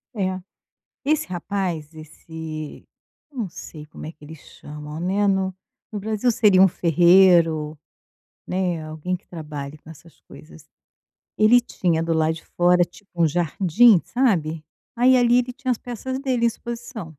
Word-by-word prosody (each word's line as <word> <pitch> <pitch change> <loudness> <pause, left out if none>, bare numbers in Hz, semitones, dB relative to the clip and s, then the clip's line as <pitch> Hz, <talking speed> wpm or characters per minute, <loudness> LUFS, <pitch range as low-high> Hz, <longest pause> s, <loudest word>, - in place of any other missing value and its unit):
É, 185 -2 -2 0.6
esse 305 +1 0
rapaz 175 -4 -4
esse 155 0 -9 0.5
eu 265 - -11
não 210 -5 -2
sei 155 -2 -10
como 150 - -11
é 160 - -7
que 150 - -29
eles 155 +1 -11
chamam, 150 +2 -10
né, 195 +3 0
no 190 -1 0 0.4
no 210 - -5
Brasil 220 +4 0
seria 205 -4 +4
um 190 - +7
ferreiro, 170 -3 +4 0.7
né, 180 -4 -2
alguém 155 +4 -4
que 180 - -13
trabalhe 150 -3 -7
com 155 - -18
essas 165 0 -15
coisas, 155 -1 -15 0.7
ele 235 +3 +5
tinha 170 -8 -1
do 165 0 -1
lado 160 0 +1
de 165 - -11
fora 175 0 +3
tipo 185 +4 -13
um 165 - +5
jardim, 175 +5 +3
sabe, 165 - 0 0.3
aí 255 +2 +5
ali 245 0 +4
ele 250 0 -3
tinha 265 0 -6
as 235 - 0
peças 255 +2 -5
dele 255 -4 0
em - - +5
exposição. 235 -3 -6
180 Hz, 155 wpm, -22 LUFS, 160-215 Hz, 0.7 s, um